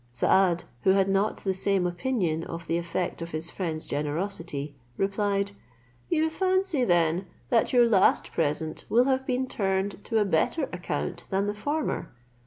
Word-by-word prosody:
Saad, 175 +8 +3 0.2
who - - +2
had 195 0 +3
not 195 +2 +1
the 190 - +1
same 190 0 +1
opinion 175 -3 -1
of 165 0 -7
the 165 +1 0
effect 170 +1 -3
of 170 - -4
his 160 +1 -4
friend's 160 -4 -3
generosity, 150 -1 -3 0.2
replied, 200 0 0 0.6
"You 320 -1 +2
fancy 375 -4 +1
then 175 -2 +2 0.2
that 235 -2 +3
your 245 -2 +6
last 205 -5 +3
present 155 0 -1
will 240 +2 +4
have 265 0 +1
been 255 0 0
turned 195 -3 -1
to 225 - 0
a 210 - +3
better 195 - +1
account 175 -5 -3
than 195 +1 +1
the 205 - -1
former. 290 +9 -2
195 Hz, 160 wpm, -27 LUFS, 170-230 Hz, 0.6 s, your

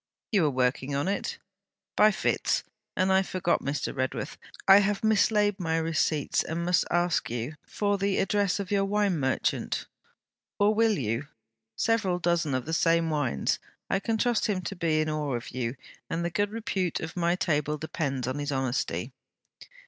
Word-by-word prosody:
'You 190 -8 +4
are - - +3
working 130 +1 0
on 140 +5 0
it?' 335 - -2 0.6
'By 215 - +6
fits. 215 - 0 0.3
And 190 0 +3
I 190 - +5
forgot, 185 -2 0
Mr. 140 +1 -2
Redworth: 130 +2 -2 0.3
I 195 +1 +9
have 205 0 0
mislaid 210 -1 +3
my 165 -2 0
receipts, 160 -2 +1
and 170 +1 -3
must 180 0 +3
ask 175 0 +1
you 120 +6 -4
for 205 -1 0
the 200 0 +1
address 200 0 +1
of 200 -1 -5
your 200 -1 +3
wine 200 -3 +1
merchant; 130 -1 -1 0.7
or, 205 +1 +4
will 220 -1 +3
you? 115 +3 -2 0.5
Several 220 - +1
dozen 170 -5 +1
of 130 - -2
the 160 - -4
same 165 0 +3
wines. 145 - 0 0.3
I 195 - +2
can 225 +2 -1
trust 235 0 +1
him 195 -4 0
to 190 +3 -5
be 160 -3 +1
in 155 - -1
awe 150 -4 -1
of 120 - -6
you, 125 0 -3 0.3
and 170 +1 -1
the 170 - -1
good 205 +4 0
repute 200 -5 -2
of 160 - -6
my 175 0 +2
table 150 -4 0
depends 140 -5 -3
on 130 +3 -2
his 145 0 -2
honesty.' 130 -2 -2
170 Hz, 175 wpm, -28 LUFS, 145-200 Hz, 0.7 s, I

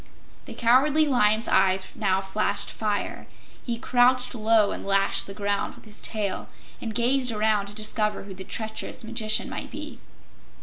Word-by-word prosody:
The 240 - -8
Cowardly 270 +7 +4
Lion's 225 -5 +2
eyes 190 0 +3
now 190 -3 0
flashed 200 +1 -2
fire; 210 -2 -3 0.4
he 235 -2 -3
crouched 250 +2 +2
low 220 -2 +3
and - - -5
lashed 195 0 +1
the 195 - -7
ground 205 -1 -2
with - - -17
his 215 -1 -8
tail 210 -4 -2 0.3
and 225 -3 -5
gazed 250 +1 +2
around 215 -2 +1
to 200 - -10
discover 215 0 -1
who 195 -1 -9
the 190 0 -8
treacherous 220 +4 -4
magician 220 -1 +1
might - - -6
be. - - -8
215 Hz, 160 wpm, -25 LUFS, 205-235 Hz, 0.4 s, Cowardly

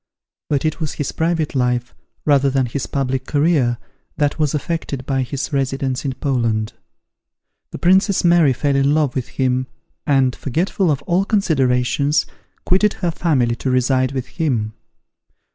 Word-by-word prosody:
But 145 0 0
it 155 +2 -1
was 155 -3 -3
his 145 - -3
private 160 -1 -1
life, 125 -2 0 0.3
rather 140 -2 +4
than 135 -1 +1
his 125 +3 -4
public 135 -1 -2
career, 145 -6 +2 0.4
that 145 +1 0
was 150 -1 +1
affected 150 -4 -3
by 135 -1 0
his 135 +4 -4
residence 135 -1 -1
in 135 - -1
Poland. 115 -6 -1 1.0
The - - -7
Princess 190 +2 +3
Mary 170 -5 +5
fell 140 +2 0
in 140 +2 +3
love 150 -5 +1
with 130 -3 -3
him, 130 -1 -1 0.4
and, 135 -3 +3
forgetful 170 +6 -1
of 140 -2 0
all 175 +5 +1
considerations, 145 - +1 0.4
quitted 200 +3 +3
her 175 -2 -2
family 135 -9 +1
to 130 - -2
reside 130 0 +2
with 130 -2 -3
him. 125 -8 -2
140 Hz, 150 wpm, -19 LUFS, 130-155 Hz, 1.0 s, Mary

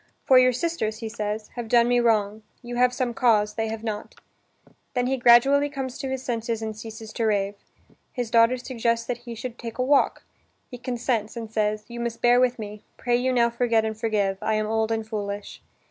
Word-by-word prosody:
("For 260 -1 +7
your 255 0 +5
sisters," 250 -5 -2
he 225 -1 -5
says, 215 -1 -4
"have 240 -2 -6
done 235 +1 +4
me 245 0 +3
wrong: 215 -2 +1 0.2
you 240 0 -6
have 250 0 +4
some 250 -1 -2
cause, 210 -4 +3
they 225 -1 -2
have 220 0 -5
not.") 215 -2 -5 0.8
Then 245 -1 +1
he 265 +1 +1
gradually 265 +4 +5
comes 265 -3 -5
to 270 -3 -3
his 265 -1 -3
senses 230 -2 -2
and 220 -1 -4
ceases 220 0 -9
to 230 - -1
rave. 200 -2 +1 0.6
His 245 -3 -4
daughter 230 +2 +5
suggests 235 -2 -1
that 245 -1 -3
he 235 - -5
should 240 +1 -7
take 230 -1 -7
a 255 - +1
walk. 280 +2 +2 0.5
He 245 - -8
consents 240 -3 -2
and 225 -1 -7
says: 210 -1 0
"You 235 0 -8
must 235 -1 -3
bear 245 0 +5
with 250 -1 +2
me. 210 -1 -7 0.2
Pray 240 -1 +1
you 255 +2 +1
now 235 -2 +3
forget 230 -2 +1
and 220 0 -2
forgive: 210 -3 0
I 220 - 0
am 215 0 0
old 220 +1 0
and 220 -1 -2
foolish." 205 -2 -5
230 Hz, 210 wpm, -25 LUFS, 220-245 Hz, 0.8 s, For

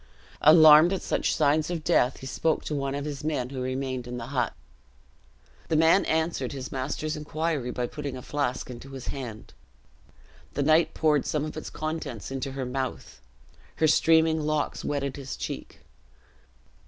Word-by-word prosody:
Alarmed 155 +1 +8
at 190 - -3
such - - 0
signs 150 +1 +2
of 170 -3 -3
death, 135 -7 +2
he - - -8
spoke 155 +4 0
to - - -3
one 140 -1 -2
of 145 0 -4
his 145 -1 -5
men 140 -5 -2
who 130 -2 -4
remained 130 -1 -3
in 125 0 -5
the 115 - -5
hut. 125 -4 0 1.1
The 160 - 0
man 160 +5 +5
answered 160 -5 -1
his 135 -1 -6
master's 150 +4 -3
inquiry 150 -3 -2
by 125 0 -2
putting 140 0 -5
a 125 - -9
flash 140 -3 -2
into 125 +2 -10
his 135 -2 -6
hand. 120 -6 -7 1.0
The 145 - +1
knight 155 +2 +3
poured 150 -3 +2
some 150 -1 -1
of 155 - -6
its 155 - -6
contents 155 -8 -5
into 135 0 -4
her 135 -1 -3
mouth. 130 - -5 0.5
Her 160 - +2
streaming 160 0 +4
locks 150 -1 -1
wetted 140 -2 -2
his 135 -2 -6
cheek. - - -6
145 Hz, 165 wpm, -27 LUFS, 130-155 Hz, 1.1 s, Alarmed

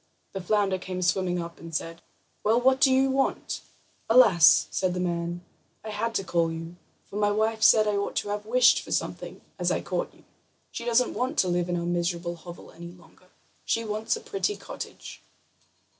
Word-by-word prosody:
The 195 - -5
flounder 195 0 +1
came 185 0 -5
swimming 180 0 +1
up, 170 0 -7
and 165 -1 -9
said: 165 +1 -4 0.4
"Well, 225 +3 +3
what 260 +2 +3
do 270 - +6
you 265 +1 +3
want?" 270 +1 -1 0.5
"Alas!" 210 -9 +6
said 185 -1 -1
the - - -2
man; 175 -1 -2 0.4
"I 215 - -6
had 225 +2 -3
to 195 - 0
call 170 -3 0
you, 165 +1 -7 0.3
for 200 - -8
my 205 -1 +2
wife 220 +1 0
said 215 0 +6
I 205 -1 +1
ought 200 - -3
to 205 - -2
have 210 +1 -4
wished 250 +2 +5
for - - -11
something, - - -3 0.2
as - - +1
I - - 0
caught - - -3
you. - - -22 0.5
She 235 - -6
doesn't 240 +1 +2
want 260 +5 -2
to 185 - +3
live 175 0 0
in 175 - 0
our 170 - -3
miserable 175 0 -1
hovel 170 +1 -12
any 170 +1 -10
longer; 180 +1 -21 0.4
she 230 0 -1
wants 215 - -1
a 455 - -8
pretty 410 0 -2
cottage." - - -9
195 Hz, 195 wpm, -26 LUFS, 175-225 Hz, 0.5 s, do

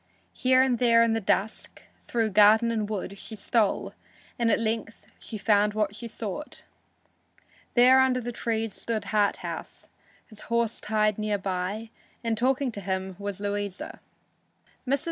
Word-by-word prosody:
Here 255 0 +4
and 250 -3 +1
there 230 -2 +5
in 230 -1 +2
the 225 - 0
dusk, 205 +2 -1 0.2
through 225 -2 -1
garden 215 +3 +6
and 215 -2 -2
wood, 200 -1 -4
she 220 - -8
stole, 215 0 0 0.5
and 235 -1 +2
at - - +4
length 225 0 -3
she 220 - -7
found 210 0 +2
what 210 -2 0
she 230 +2 -6
sought. 225 +6 -6 1.1
There 255 +2 +7
under 260 -1 +2
the 240 0 -4
trees 225 -2 -2
stood 225 -2 -3
Harthouse, 205 -2 -2 0.4
his 215 -2 -12
horse 235 -1 0
tied 215 -1 +1
near 210 -1 0
by, 195 +3 -3 0.3
and 230 -1 0
talking 260 +3 +1
with 200 - -7
him 190 -1 -2
was 200 -1 -5
Louisa. 205 -1 -4 0.9
Mrs. 275 +2 +2
220 Hz, 150 wpm, -27 LUFS, 205-235 Hz, 1.1 s, There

